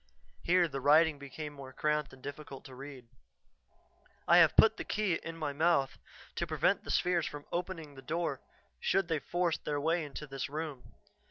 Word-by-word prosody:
Here 175 0 +3
the 135 -3 -5
writing 150 +2 +5
became 145 +2 -7
more 135 -2 -10
cramped 150 0 0
and 130 -1 -16
difficult 145 -1 -8
to 130 - -11
read. 135 -2 -10 1.2
"I 170 - +7
have 165 -3 +6
put 220 0 +6
the - - -4
key 205 -6 0
in 165 0 -7
my 150 -3 -2
mouth 140 -3 +2 0.4
to - - -1
prevent - - +1
the - - -10
spheres 175 -3 +2
from 145 -1 -8
opening 170 -4 -4
the 135 - -11
door 165 +6 -2 0.4
should 195 - +1
they 160 -2 +1
force 175 +3 -1
their 145 -1 -2
way 165 +3 +1
into 150 0 -7
this 135 -1 -5
room. 150 -4 -6
150 Hz, 180 wpm, -32 LUFS, 140-170 Hz, 1.2 s, I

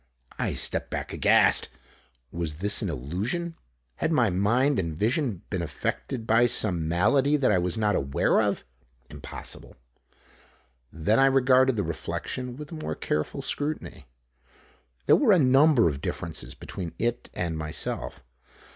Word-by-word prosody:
I - - -1
stepped - - -1
back - - -4
aghast. - - +4 0.6
Was 85 -3 -3
this 100 +6 +1
an 100 - -2
illusion? 95 - -3 0.4
Had - - -1
my 125 -10 +3
mind 120 +9 +2
and 80 -4 -3
vision 115 - 0
been 95 -4 -1
affected 110 - -4
by 115 +2 +4
some 90 -9 0
malady 135 - +3
that 135 -6 +2
I 95 - +3
was 90 +2 -1
not 105 -1 +1
aware 70 0 +2
of? - - -1 0.5
Impossible! - - -8 1.2
Then 95 +9 +1
I 135 - +6
regarded 130 -1 +4
the 100 - 0
reflection 125 +9 -5
with 150 +2 -9
a 160 -2 -7
more - - -3
careful 75 0 -3
scrutiny. 145 - -4 1.0
There - - +6
were 245 -8 +4
a - - +5
number 135 - +5
of 70 -3 -2
differences - - -5
between 90 -4 -7
it 120 +1 -2
and 85 -2 -2
myself. 75 -4 -5
110 Hz, 145 wpm, -26 LUFS, 85-135 Hz, 1.2 s, I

